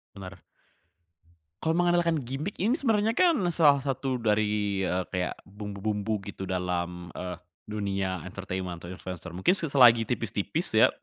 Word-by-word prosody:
Bener. 95 Hz, -1 st, -10 dB, 1.2 s
Kalau 160 Hz, +1 st, +1 dB
mengandalkan 175 Hz, -1 st, +3 dB
gimik 135 Hz, -, -4 dB
ini 210 Hz, +6 st, +1 dB
sebenarnya 225 Hz, -6 st, +2 dB
kan 340 Hz, +4 st, +4 dB, 0.2 s
salah 145 Hz, -4 st, +4 dB
satu 135 Hz, -1 st, -1 dB
dari, 105 Hz, -3 st, +1 dB
eee, 90 Hz, -1 st, 0 dB
kayak 90 Hz, -1 st, -3 dB
bumbu-bumbu 105 Hz, +1 st, -3 dB
gitu 95 Hz, -1 st, -6 dB
dalam, 90 Hz, -1 st, -3 dB
eee, 90 Hz, -1 st, -5 dB, 0.3 s
dunia 100 Hz, -3 st, -2 dB
entertainment 95 Hz, -2 st, -5 dB
atau 85 Hz, -, -8 dB
influencer 90 Hz, -1 st, -7 dB
mungkin 95 Hz, -, +3 dB
se 170 Hz, -5 st, -3 dB
selagi 120 Hz, -4 st, +7 dB
tipis-tipis -, -, -2 dB
ya. -, -, +7 dB
105 Hz, 135 wpm, -28 LUFS, 95-145 Hz, 1.2 s, selagi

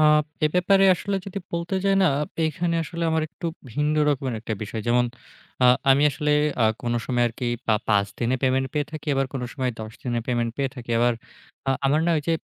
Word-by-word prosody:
আ -, -, +5 dB, 0.4 s
এ -, -, +6 dB
ব্যাপারে 195 Hz, +2 st, +4 dB
আসলে 200 Hz, +3 st, -2 dB
যদি 195 Hz, 0 st, -4 dB
বলতে 170 Hz, +2 st, -2 dB
যাই 195 Hz, -, +4 dB
না, -, -, +5 dB, 0.4 s
এইখানে 170 Hz, +2 st, -1 dB
আসলে 170 Hz, +1 st, -5 dB
আমার 160 Hz, 0 st, +1 dB
একটু 170 Hz, -, -7 dB, 0.3 s
ভিন্ন 150 Hz, +4 st, 0 dB
রকমের 135 Hz, -4 st, 0 dB
একটা 110 Hz, -1 st, -3 dB
বিষয়। 110 Hz, +1 st, -5 dB
যেমন, 120 Hz, +1 st, +4 dB, 0.6 s
আ -, -, +8 dB, 0.2 s
আমি 140 Hz, +2 st, +5 dB
আসলে 150 Hz, +1 st, 0 dB, 0.3 s
আ -, -, +5 dB, 0.2 s
কোনো 120 Hz, 0 st, 0 dB
সময় 120 Hz, -2 st, +1 dB
আরকি 120 Hz, +2 st, -5 dB, 0.2 s
পা 110 Hz, -, +4 dB
৫ 100 Hz, -2 st, +3 dB
দিনে 125 Hz, +2 st, +1 dB
পেমেন্ট 130 Hz, 0 st, +2 dB
পেয়ে 145 Hz, -1 st, -1 dB
থাকি 155 Hz, 0 st, -7 dB
আবার 135 Hz, 0 st, +1 dB
কোনো 125 Hz, -, -2 dB
সময় 130 Hz, -2 st, -1 dB
১০ 110 Hz, 0 st, -7 dB
দিনে 120 Hz, -2 st, -1 dB
পেমেন্ট 120 Hz, -2 st, 0 dB
পেয়ে 135 Hz, -1 st, -1 dB
থাকি। 120 Hz, -2 st, -8 dB
আবার, 120 Hz, +1 st, +3 dB, 0.6 s
আ -, -, +4 dB, 0.2 s
আমার 150 Hz, +3 st, +3 dB
না -, -, +3 dB
ঐ -, -, +1 dB
যে 165 Hz, -, +3 dB
135 Hz, 210 wpm, -24 LUFS, 120-160 Hz, 0.6 s, আ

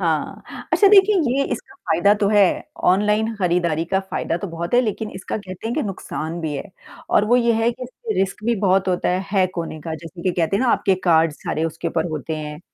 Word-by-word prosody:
हाँ। -, -, -1 dB, 0.3 s
अच्छा 400 Hz, -, +6 dB
देखिए 405 Hz, 0 st, +6 dB, 0.2 s
ये 275 Hz, -, +2 dB
इसका 395 Hz, -, -7 dB
फ़ायदा 200 Hz, -, +2 dB
तो 200 Hz, -, +3 dB
है, 205 Hz, -3 st, +3 dB, 0.3 s
ऑनलाइन 210 Hz, +4 st, +2 dB
खरीदारी 170 Hz, -4 st, +1 dB
का 190 Hz, +3 st, 0 dB
फ़ायदा 190 Hz, -3 st, -3 dB
तो 190 Hz, +3 st, -5 dB
बहुत 170 Hz, +5 st, -4 dB
है 245 Hz, -, +6 dB
लेकिन 220 Hz, -2 st, -3 dB
इसका 190 Hz, -, -4 dB
कहते 190 Hz, -1 st, -8 dB
हैं 235 Hz, -, -2 dB
कि 310 Hz, -, 0 dB
नुकसान 170 Hz, -4 st, -5 dB
भी 160 Hz, -2 st, -3 dB
है। 140 Hz, -, -3 dB, 0.5 s
और 205 Hz, -, +4 dB
वो 240 Hz, +3 st, +4 dB
ये 235 Hz, -1 st, +3 dB
है 225 Hz, +1 st, +2 dB
कि 250 Hz, +2 st, -11 dB
इससे 430 Hz, -, -5 dB
रिस्क 195 Hz, +2 st, -2 dB
भी 235 Hz, +1 st, +2 dB
बहुत 190 Hz, -1 st, +2 dB
होता 180 Hz, -, 0 dB
है 180 Hz, +1 st, +1 dB
हैक 190 Hz, -3 st, +2 dB
होने 165 Hz, -2 st, -4 dB
का 160 Hz, +1 st, -5 dB
जैसे 165 Hz, +2 st, -10 dB
कि 185 Hz, -, +1 dB
कहते 165 Hz, +4 st, +1 dB
हैं 230 Hz, -, 0 dB
ना 255 Hz, -, +2 dB
आपके 195 Hz, -, +2 dB
कार्ड 165 Hz, -2 st, +4 dB
सारे 155 Hz, +1 st, -3 dB
उसके 165 Hz, 0 st, -3 dB
ऊपर 165 Hz, 0 st, -1 dB
होते 155 Hz, +1 st, -4 dB
हैं। 150 Hz, 0 st, -6 dB
190 Hz, 230 wpm, -21 LUFS, 165-220 Hz, 0.5 s, अच्छा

